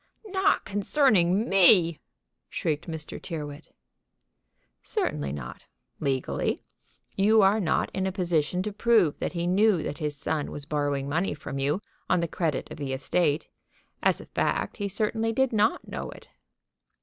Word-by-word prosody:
"Not 395 0 +1
concerning 205 - +2
me!" 180 -4 +6 0.5
shrieked 155 +1 -2
Mr. 160 -2 -6
Tyrrwhit. 150 -3 -7 1.1
"Certainly 70 -2 -2
not, 70 -4 -8 0.3
legally. 135 -2 -1 0.5
You 210 +2 +5
are 200 +3 +4
not 170 -6 0
in 190 0 -1
a - - -1
position 175 -1 0
to 210 0 -4
prove 210 -7 +3
that - - -3
he 170 -1 -2
knew 190 -1 +3
that 145 - -5
his 150 -2 -3
son 150 +1 -2
was 145 - -6
borrowing 145 -2 -1
money 165 +4 -1
from 140 -1 -6
you 145 +9 0 0.3
on - - +3
the 170 - 0
credit 160 -4 -2
of - - -7
the 140 -2 -3
estate. 150 +3 0 0.5
As - - +2
a - - -10
fact - - -1
he 205 -3 -2
certainly 220 +3 0
did 265 +1 +1
not 215 +1 +1
know - - -5
it." - - -13
170 Hz, 150 wpm, -27 LUFS, 145-205 Hz, 1.1 s, me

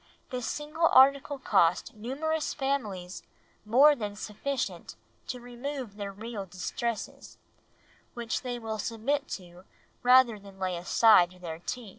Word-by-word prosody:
this 250 -2 -3
single 305 +3 0
article 275 +2 +5
cost 180 -9 +2
numerous 295 +8 -2
families 215 -11 -3 0.4
more 275 +7 +6
than 210 -5 -5
sufficient 250 +6 -4 0.3
to 250 - -4
remove 245 -1 -6
their 200 -1 -5
real 215 +1 -6
distresses, 195 +5 -5 0.8
which 235 -1 -3
they 245 -2 -4
will 220 -2 -5
submit 270 +7 -1
to 180 -1 -8 0.4
rather 250 -3 +5
than 195 -1 -14
lay 185 -1 -2
aside 180 +1 +5
their 165 -2 -6
tea. 230 +5 -6
230 Hz, 125 wpm, -29 LUFS, 200-270 Hz, 0.8 s, more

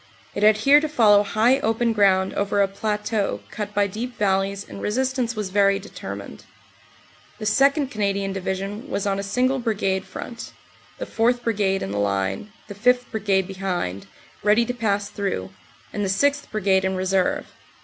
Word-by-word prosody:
It - - -4
had 215 0 +6
here 275 +7 +6
to 310 0 -3
follow 215 -8 +5
high 225 +6 +2
open 225 -1 +1
ground 190 -3 +3
over 200 0 0
a 200 - +4
plateau 210 +1 -2
cut 210 -1 -5
by 205 0 +3
deep 230 +5 -5
valleys 195 0 0
and - - -9
resistance 255 +1 -1
was 210 -3 -4
very 200 0 +3
deter 195 - -7
mined. - - -10 0.9
The 215 - -6
2nd. 275 +5 +3
Canadian 200 -2 -1
Division 195 +6 -4
was 200 - -2
on 195 -1 0
a - - -1
single 250 +7 0
Brigade 195 -5 -1
front, 235 -1 -8 0.4
the - - -5
4th. 240 +2 +1
Brigade 200 -4 0
in 95 - -4
the 100 - -2
line, 100 - -1 0.2
the 205 - -7
5th. 250 +4 +1
Brigade 200 -4 +1
behind, 180 - -4 0.3
ready 210 +3 +3
to 245 - -3
pass 205 -4 -1
through, 145 - -3 0.4
and 205 - -2
the 195 - -1
6th. 285 +9 +1
Brigade 195 -3 +1
in 190 0 0
reserve. 185 0 0
205 Hz, 170 wpm, -23 LUFS, 195-230 Hz, 0.9 s, had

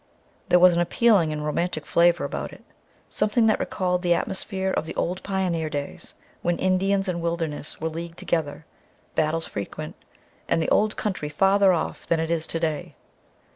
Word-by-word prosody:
There 180 - +6
was 180 0 +7
an 170 - +2
appealing 180 -2 +3
and 150 0 -3
romantic 155 0 -1
flavor 175 0 +3
about - - -4
it, - - -14 0.4
something 215 +2 +1
that 220 - +3
recalled 180 -2 -1
the 175 -1 +3
atmosphere 190 0 -2
of 160 - -1
the 165 - -6
old 180 +2 -1
pioneer 180 -5 -1
days 145 -2 -6 0.3
when 175 0 0
Indians 195 +1 +1
and 175 -2 -2
wilderness 165 -3 -3
were 160 - -1
leagued 165 +1 -6
together, 160 -2 -2 0.5
battles 160 +1 0
frequent, 100 -1 -6 0.5
and - - +2
the 160 - 0
Old 215 0 +3
Country 185 -8 -2
farther 195 +5 +4
off 170 -3 -2
than 165 - +2
it 165 0 -1
is 165 -1 -1
today. 165 -2 -2
170 Hz, 170 wpm, -25 LUFS, 160-190 Hz, 0.5 s, was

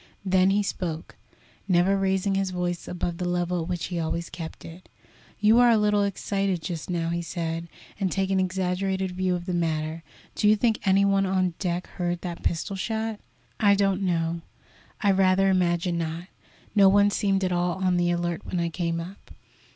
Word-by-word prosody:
Then 185 0 +4
he 205 +1 +2
spoke, 170 -4 -4 0.5
never 185 +1 +3
raising 195 0 +1
his 195 0 0
voice 175 -1 -3
above 175 -1 -3
the 180 -1 -1
level 175 0 0
at 160 - -5
which 175 -1 -2
he 175 -2 -3
always 170 +1 -3
kept 165 -2 -8
it. 170 +3 -12 0.5
"You 215 +3 +5
are 245 -1 +6
a 230 - +5
little 210 -1 +2
excited 195 -2 -1
just 170 -2 -5
now," 170 -2 -1
he 170 0 -1
said, 165 -1 -4 0.3
"and 190 -3 0
take 195 -1 0
an 190 - +2
exaggerated 190 0 -1
view 185 0 0
of 175 -1 -5
the 180 - -3
matter. 160 -1 -1 0.3
Do 210 - +2
you 215 - +6
think 225 +1 +1
any 195 +1 +4
one 195 -1 +2
on 185 -2 +1
deck 180 -2 -2
heard 175 -1 -3
that 175 -2 -6
pistol 185 +4 -2
shot?" 220 +2 -3 0.4
"I 200 -1 +5
don't 195 -1 +1
know; 170 -2 0 0.6
I 205 -3 +4
rather 190 0 +3
imagine 175 -1 +1
not. 165 +1 -3 0.5
No 200 -2 +6
one 205 +1 +4
seemed 195 -2 +1
at 185 - 0
all 175 0 +1
on 185 -1 0
the 175 0 +2
alert 175 -1 -1
when 180 - -3
I 170 0 0
came 170 0 -2
up." 180 +4 -9
185 Hz, 190 wpm, -26 LUFS, 175-195 Hz, 0.6 s, are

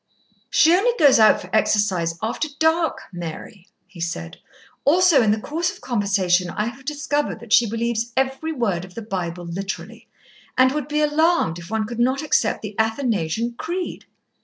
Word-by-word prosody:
"She 325 +2 +5
only 435 +7 +3
goes 285 -6 +6
out 215 -1 +6
for - - -5
exercise 190 -6 +1
after 230 +7 -1
dark, 320 +1 +1
Mary," 175 +3 -8 0.2
he 190 -2 -15
said. 165 - -4 0.5
"Also 335 -1 +5
in 220 - +2
the 215 +1 +2
course 330 +9 -2
of - - -14
conversation 195 -6 +1
I 210 - -2
have 255 +3 -14
discovered 295 -3 -2
that 220 -1 -4
she 235 -3 +5
believes 235 +1 -2
every 265 +4 0
word 210 - -1
of 185 -1 -12
the 230 - -6
Bible 180 -4 -4
literally, 195 +4 -6 0.5
and 255 0 +5
would 295 -1 -3
be 300 0 0
alarmed 300 - +2
if 170 - -11
one 220 0 -1
could 235 +2 -6
not 260 +4 +1
accept 230 -8 +1
the 210 -1 -6
Athanasian 225 - 0
Creed. 355 +2 -4
230 Hz, 170 wpm, -22 LUFS, 195-295 Hz, 0.5 s, goes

